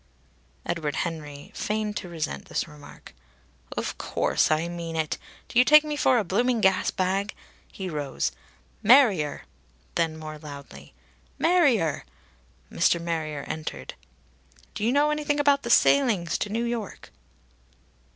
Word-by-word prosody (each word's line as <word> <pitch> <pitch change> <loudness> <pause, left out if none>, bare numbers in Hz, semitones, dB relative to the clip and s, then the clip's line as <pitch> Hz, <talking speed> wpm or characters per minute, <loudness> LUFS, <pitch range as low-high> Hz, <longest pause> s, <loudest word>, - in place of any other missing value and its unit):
Edward 155 -4 -2
Henry 150 -4 -5
feigned 210 0 -2
to 180 - -6
resent 160 -2 -4
this - - -2
remark. 150 -2 -14 0.6
"Of - - -3
course - - +1
I 155 +2 +1
mean 170 -1 -5
it. 160 -1 -1 0.3
Do 235 - +2
you - - +8
take 300 +3 +7
me 300 -1 -3
for 260 -3 +3
a 225 - +2
blooming 235 +6 +1
gas 190 -3 +3
bag?" 195 +2 -1 0.4
He 190 - -6
rose. 145 - -2 0.5
"Marrier!" 210 - +4 0.5
Then 165 -2 0
more 155 -1 -8
loudly: 140 - -11 0.4
"Marrier!" 275 - +3 0.7
Mr. 170 - +2
Marrier 160 -4 -3
entered. 155 - -6 0.8
"Do - - -5
you 230 - +3
know 290 +2 +3
anything 295 -1 0
about 285 -1 +4
the 235 - -5
sailings 230 - +4
to 210 - -2
New 225 +3 -1
York?" 235 -3 -5
185 Hz, 135 wpm, -26 LUFS, 155-240 Hz, 0.8 s, you